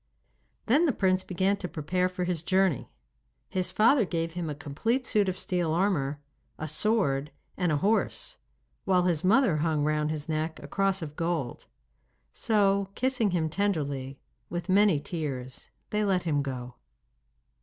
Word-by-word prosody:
Then 285 +9 +4
the 290 - +2
prince 185 -2 +1
began 190 +2 0
to 185 - -5
prepare 180 +3 -1
for 180 0 -3
his 175 -3 -1
journey. 185 -5 +1 0.6
His 185 -2 -1
father 230 +4 +4
gave 165 -3 -2
him 175 -2 -3
a 150 - -4
complete 160 - -1
suit 205 -4 +2
of 185 - -3
steel 175 -3 -1
armour, 155 -6 0 0.4
a 155 - -4
sword, 155 -5 +1 0.3
and 180 -3 0
a 150 - +2
horse, 210 +8 0 0.5
while 185 -2 +3
his 175 -2 0
mother 200 - +4
hung 155 -1 +1
round 150 0 +1
his 155 -1 -4
neck 160 0 -2
a 140 - -9
cross 195 +1 0
of 150 -1 -7
gold. 165 -7 -2 0.7
So, 200 -3 +2
kissing 255 -4 +1
him 170 -3 0
tenderly, 145 -7 -2 0.3
with 175 +1 -4
many 195 -4 +4
tears 140 -6 -5 0.2
they 210 0 +1
let 190 -3 +1
him 150 -4 +1
go. 125 -3 -6
175 Hz, 155 wpm, -28 LUFS, 150-195 Hz, 0.7 s, Then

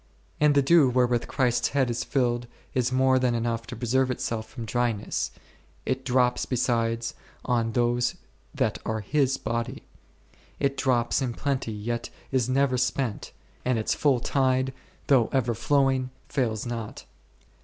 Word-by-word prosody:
and 150 -1 +4
the 140 - +5
dew 150 -1 +6
wherewith 125 -1 +2
Christ's 125 -3 +1
head 130 -3 +3
is 120 - -2
filled, 120 -3 0 0.3
is 125 -1 +1
more 130 0 +4
than 125 -2 +1
enough 115 0 -2
to - - -6
preserve 125 +3 +1
itself 115 -3 -3
from 115 0 -7
dryness, 115 -2 -1 0.6
it 130 0 -1
drops 125 -1 +2
besides 115 -2 0 0.3
on 115 -3 +1
those 120 +1 +1 0.4
that - - 0
are 110 0 -2
His 135 +4 +1
body; 115 +1 -3 0.8
it 140 -1 +1
drops 125 -2 +1
in 125 -3 -2
plenty 135 -5 -1
yet 115 +3 -3 0.2
is 130 -2 +1
never 130 -1 +2
spent, 125 -3 -1 0.3
and 125 -1 +1
its 110 - 0
full 140 -4 +2
tide, 130 0 +1 0.3
though 130 -5 +4
ever 125 -3 +1
flowing, 130 +2 +2 0.2
fails 115 -6 -1
not. 115 -3 -5
125 Hz, 145 wpm, -26 LUFS, 115-130 Hz, 0.8 s, dew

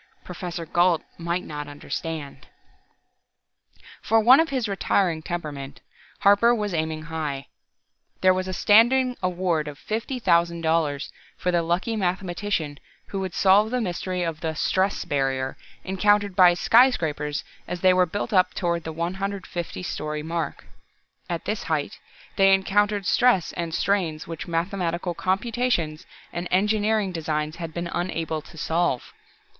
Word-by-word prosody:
Professor 175 -1 -6
Gault 175 0 +2 0.2
might 170 +2 -2
not 150 -1 -6
understand.... 145 -1 -6 1.5
For 225 +1 +3
one 245 +6 +7
of 325 0 +2
his 255 -5 -1
retiring 185 -4 +1
temperament, 150 -5 -5 0.4
Harper 205 +4 +5
was 210 -4 -2
aiming 160 -1 -2
high. 155 -4 -4 0.8
There 185 0 +6
was 185 0 -2
a - - -3
standing 250 +6 +4
award 175 -4 0
of 145 -1 -7
$50,000 170 - 0 0.3
for 180 - 0
the 175 -1 +2
lucky 175 +7 -1
mathematician 180 -5 -2 0.3
who 195 - -3
would 190 -2 -4
solve 200 +3 +5
the 250 +2 0
mystery 180 -3 -2
of 165 -2 -3
the 160 -2 -3
"stress 190 +5 0
barrier" 135 -2 -1 0.3
encountered 205 +1 +2
by 180 -2 +7
skyscrapers 160 - +3 0.2
as 180 - -5
they 185 -1 +6
were 180 0 +3
built 205 +6 -4
up 185 -1 +3
toward 170 -2 -1
the 160 - -3
150 180 +1 -4
story 150 -3 -4
mark. 165 +1 -4 0.6
At - - -3
this - - -3
height, - - -2 0.4
they 195 -1 +6
encountered 205 +1 +1
stress 245 -9 +3
and 170 -1 -3
strains 170 -3 0
which 165 +1 -7
mathematical 175 0 -1
computations 190 -4 -1 0.3
and 175 +1 -3
engineering 210 +1 +2
designs 155 -1 -2
had 165 -2 -5
been 170 +2 -4
unable 165 -3 -2
to 160 - -15
solve. 165 -4 -1
175 Hz, 135 wpm, -24 LUFS, 160-200 Hz, 1.5 s, one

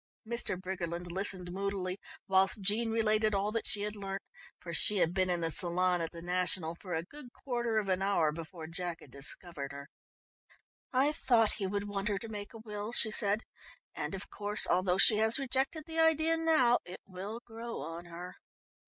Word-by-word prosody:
Mr. 235 -5 -2
Briggerland 175 -2 -4
listened 185 -1 -1
moodily 195 0 -3 0.3
whilst 195 +1 +3
Jean 220 +4 +2
related 215 -1 +2
all 200 +2 0
that 230 0 -2
she 205 - 0
had 210 0 -3
learnt, 195 -1 -5 0.4
for 170 - -7
she 205 +5 +3
had 170 -2 +2
been 185 -1 +1
in 175 -1 0
the 165 0 -1
salon 180 +1 +3
at 165 - -2
the 170 -1 -10
National 180 -2 0
for 180 0 -6
a 160 - -1
good 255 - -12
quarter 240 -4 -2
of 210 -2 0
an 185 0 0
hour 195 -6 +2
before 165 +1 -8
Jack 170 0 -5
had 135 - -15
discovered 140 +1 -3
her. 140 0 -9 1.0
"I 270 +3 +3
thought 235 -7 +3
he 200 -4 -3
would 205 +1 -2
want 200 0 -3
her 205 -2 0
to 225 +3 -7
make 205 -2 -6
a - - -6
will," 210 -1 -6
she 225 -2 +5
said, 210 +1 +4 0.5
"and, - - -4
of 195 - -6
course, 210 0 +4
although 180 0 +2
she 210 +2 +7
has 220 +1 +4
rejected 270 +3 -1
the 325 0 -4
idea 320 0 +4
now, 315 -7 +3
it 180 - -10
will 195 +4 -7
grow 230 -3 -7
on 165 +4 -7
her. 175 +1 -9
195 Hz, 195 wpm, -32 LUFS, 180-225 Hz, 1.0 s, she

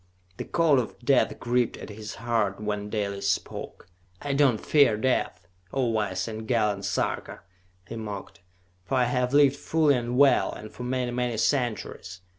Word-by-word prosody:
The - - -5
cold 160 -5 +3
of 120 - -4
death 130 +1 +2
gripped 120 0 0
at - - -9
his 105 +1 -8
heart 115 -4 -1
when 105 -1 -3
Dalis 100 -2 -2
spoke. 100 - -4 0.3
"I 145 -1 -3
do 145 +1 +4
not 120 -5 +1
fear 140 -8 +4
death, 110 -7 -1 0.2
O 135 -2 0
wise 105 -4 -1
and 110 0 -6
gallant 105 -4 +1
Sarka!" - - -2 0.5
he - - -6
mocked. 105 -3 -7 0.4
"For 115 - -2
I 125 - +4
have 125 +1 0
lived 140 -1 +5
fully 155 -1 +2
and 120 -1 -1
well, 140 -2 +5
and 110 - -9
for - - -11
many, 125 0 -1
many 120 -2 -1
centuries! 110 -8 -2
120 Hz, 170 wpm, -26 LUFS, 105-130 Hz, 0.5 s, lived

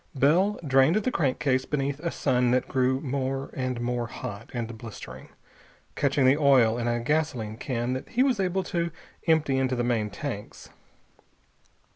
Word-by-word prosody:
Bell 170 +10 +3
drained 135 +4 +4
the 215 +4 +1
crankcase 130 - +1
beneath 140 -1 -2
a 170 +2 -2
sun 125 -6 +1
that 125 +1 +1
grew 130 0 +1
more 135 -1 -2
and 130 -2 -2
more 120 0 -2
hot 105 -1 -7
and 115 -1 -4
blistering, 105 - -10 0.7
catching 140 -1 +2
the 130 +3 +5
oil 130 -6 +5
in 120 - -1
a 120 0 +1
gasoline 125 -5 -1
can 120 0 -2
that 130 - -5
he 250 - +2
was 260 -6 +1
able 190 0 0
to 170 -1 -1 0.4
empty 150 -5 +3
into 130 -1 +1
the 120 - -1
main 115 -3 0
tanks. 120 -5 -7
130 Hz, 160 wpm, -27 LUFS, 120-150 Hz, 0.7 s, the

